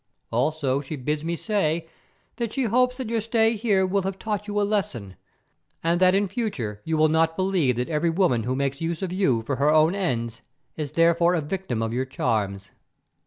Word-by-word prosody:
Also 135 +2 0
she 145 +2 -6
bids 150 +3 -2
me 170 +1 -1
say 170 -5 -1 0.5
that 235 -3 -2
she 270 - -1
hopes 250 +2 +2
that 260 -3 -4
your 225 0 0
stay 225 0 +2
here 205 -4 +2
will 195 +2 +1
have 190 0 -3
taught 210 -1 -3
you 205 0 -1
a - - +2
lesson, 190 - -2 0.7
and 170 +2 +1
that 185 0 +5
in 200 +1 +2
future 180 - -3
you 160 -1 -1
will 155 0 +5
not 160 +1 +2
believe 185 -9 +1
that 125 +1 -2
every 160 +1 0
woman 165 -9 +2
who 125 +4 -2
makes 140 +1 -2
use 165 +2 -2
of 180 -1 -3
you 135 - +1
for 135 +3 -2
her 145 +2 +3
own 155 +2 +4
ends 120 - -2 0.3
is 150 -3 -5
therefore 170 +1 +4
a - - +1
victim 150 -8 -3
of 115 0 -2
your 130 +2 -1
charms. 100 -6 -2
165 Hz, 205 wpm, -25 LUFS, 135-200 Hz, 0.7 s, that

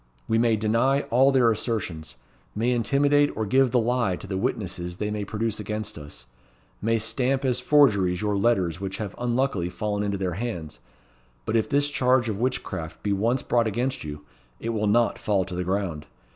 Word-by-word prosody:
We 115 - +2
may 115 -1 +3
deny 115 +6 +2
all 130 +3 +5
their 125 -4 +4
assertions; 90 - -3 0.4
may 115 +4 +1
intimidate 140 +5 +3
or 110 - 0
give 130 +5 +3
the 125 - +1
lie 120 -4 +1
to 90 - -9
the 95 0 -4
witnesses 90 -2 -3
they 105 +1 -2
may 105 -1 -2
produce 110 +2 -2
against 105 0 -4
us; 75 -4 -10 0.6
may 115 +2 +2
stamp 130 +4 0
as 125 -1 +1
forgeries 105 -11 +3
your 105 0 0
letters 95 -5 +1
which 95 0 -4
have 105 -3 -5
unluckily 120 -7 0
fallen 105 +2 -2
into 100 -1 -1
their 95 -2 -2
hands; 85 -11 -5 0.7
but - - -1
if 110 +3 +1
this 145 0 +2
charge 125 -3 +2
of 105 -2 -3
witchcraft 95 -10 -3
be 100 - +1
once 115 +6 0
brought 120 -2 +2
against 125 +5 -2
you, 75 -1 -8 0.3
it 115 - -4
will 105 -2 0
not 115 +3 +2
fall 100 -3 +1
to 95 - -8
the 90 0 -2
ground. 90 -5 -2
110 Hz, 185 wpm, -25 LUFS, 95-125 Hz, 0.7 s, all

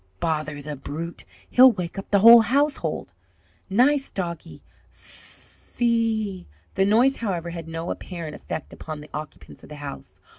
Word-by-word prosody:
Bother 155 -2 -2
the 150 +1 -6
brute! 160 +5 -7 0.2
He'll 255 +1 +7
wake 180 -1 -5
up 195 - -9
the 200 -1 +3
whole 230 +2 +10
household! 245 - -1 0.6
Nice 270 +7 +3
doggie! 170 -4 -6 0.3
Phe - - -16
e 220 -5 0
" - - -37
The 195 - +2
noise, 240 +7 +3
however, 175 -6 -3
had 165 -1 -7
no 165 +1 -4
apparent 170 -4 -6
effect 155 - -7
upon 155 -1 -7
the 150 - -14
occupants 150 0 -9
of - - -15
the 150 - -9
house. 145 -1 -9
175 Hz, 155 wpm, -24 LUFS, 155-230 Hz, 0.6 s, whole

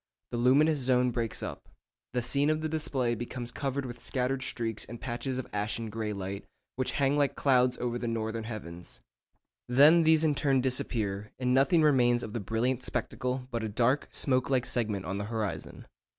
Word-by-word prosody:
The 120 - -2
luminous 145 +5 +4
zone 125 -1 +2
breaks 115 -1 -2
up. - - -7 0.4
The 125 -1 0
scene 140 +4 +1
of 155 0 +1
the 155 - -1
display 140 -6 -1
becomes 120 +1 -5
covered 140 -1 -3
with 120 -1 -8
scattered 130 +1 -1
streaks 115 -4 -3
and 120 0 -8
patches 125 +2 -3
of 130 - -3
ashen 110 +2 -2
grey 110 0 -3
light, 100 0 -5 0.3
which 130 0 -2
hang 140 0 +2
like 145 -1 +2
clouds 125 -2 +3
over 120 0 -2
the 120 - -3
northern 115 -1 -2
heavens. 90 -7 -8 0.7
Then 145 +7 +7
these 160 -1 +4
in 155 -2 +3
turn 140 -2 +2
disappear, 110 -5 -1
and 125 -1 +1
nothing 155 +5 +4
remains 125 -5 +4
of 110 - -6
the 120 - -2
brilliant 115 +5 -1
spectacle 125 0 -3
but 115 -2 -2
a 110 - -3
dark 120 +6 +1
smoke 130 -2 0
like 130 -2 +2
segment 105 -6 -1
on 95 +3 -3
the 100 - -3
horizon. 110 -2 -4
125 Hz, 185 wpm, -29 LUFS, 115-135 Hz, 0.7 s, Then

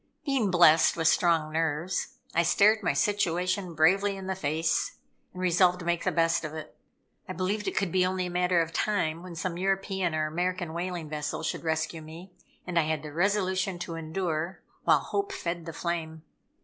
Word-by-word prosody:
Being 270 -8 +1
blessed 170 -3 +5
with 165 -1 +2
strong 160 -2 +2
nerves, 160 +2 -1 0.2
I 170 - +4
stared 210 +6 +4
my 175 - +1
situation 180 0 0
bravely 195 +6 +3
in 190 - -7
the 190 - -1
face, 160 -2 0 0.4
and 180 - -10
resolved 180 0 +4
to 180 - -8
make 170 -1 0
the - - +2
best 165 0 +2
of 155 0 -5
it. 155 - -8 0.5
I - - -3
believed 200 +4 -2
it - - -3
could 195 -5 +1
be 185 +1 +3
only 185 0 0
a - - -4
matter 180 -1 +2
of 165 0 -9
time 170 -6 0
when 180 -1 -9
some 170 +1 -3
European 190 -2 0
or 155 0 0
American 175 +1 -2
whaling 175 -1 -4
vessel 150 +1 -3
should 160 - -3
rescue 160 0 -1
me: 165 +4 -11 0.3
and 175 -2 +1
I 155 - +1
had 155 -1 -1
the 150 -1 -8
resolution 190 +1 +1
to 175 -1 -5
endure, 165 +1 -3 0.2
while - - +5
hope 400 0 -2
fed 170 - -4
the - - -4
flame. 160 -1 -4
175 Hz, 190 wpm, -28 LUFS, 160-185 Hz, 0.5 s, blessed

